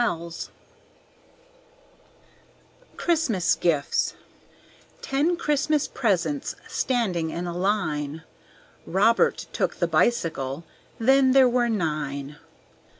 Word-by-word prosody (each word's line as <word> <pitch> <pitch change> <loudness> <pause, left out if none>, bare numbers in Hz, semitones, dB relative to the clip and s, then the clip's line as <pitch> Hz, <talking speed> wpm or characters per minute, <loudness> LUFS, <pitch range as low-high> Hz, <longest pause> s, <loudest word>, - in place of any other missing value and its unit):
Christmas 255 - +1
Gifts 150 -5 0 0.9
Ten 300 +6 +1
Christmas 300 -1 +1
presents 235 +6 -1
standing 190 -11 -1
in 170 +2 -4
a 175 -1 -4
line; 160 -6 -1 0.6
Robert 210 +6 +2
took - - -1
the - - 0
bicycle, 160 - 0 0.3
then 265 +2 +4
there 265 -1 +7
were 240 -1 +1
nine. 150 -7 -3
205 Hz, 80 wpm, -25 LUFS, 160-265 Hz, 0.9 s, there